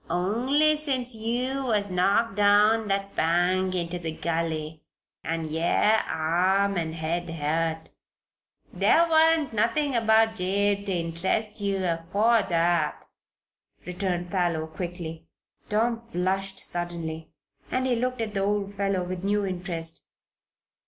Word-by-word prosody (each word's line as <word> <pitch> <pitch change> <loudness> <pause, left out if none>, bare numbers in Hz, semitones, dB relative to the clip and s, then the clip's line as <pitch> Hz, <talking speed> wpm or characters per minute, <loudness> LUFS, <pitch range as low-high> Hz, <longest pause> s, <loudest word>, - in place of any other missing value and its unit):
"Only 255 - +2
since 260 -5 -2
yeou 245 +5 -2
was 205 -5 0
knocked 195 +5 +2
down 210 +2 +4
that 195 0 -2
bank 180 +3 +1
inter 175 0 -2
the 165 -2 -4
gully, 160 -1 -3 0.4
an' 165 0 -2
yer 170 +7 +2
arm 185 +5 +1
an' 165 -3 -2
head 165 +2 -3
hurt. 160 +1 -2 0.8
There 335 +1 +4
warn't 320 -3 +4
nothin' 260 +7 +1
about 225 -1 +4
Jabe 200 +1 0
ter 195 - -1
interest 180 +6 -1
yeou 195 -1 -1
afore 195 +7 +2
that," 170 -3 +1 0.9
returned 180 -1 -3
Parloe, 175 -5 0
quickly. 165 0 -6 0.4
Tom 230 +2 0
flushed 190 +1 -1
suddenly 170 -3 -4 0.4
and 255 0 -1
he 255 -2 +2
looked 250 +1 -2
at 215 -2 -3
the 195 - -1
old 200 0 -1
fellow 195 -2 -1
with 180 0 -5
new 205 0 +1
interest. 175 -3 -3
190 Hz, 125 wpm, -26 LUFS, 170-220 Hz, 0.9 s, down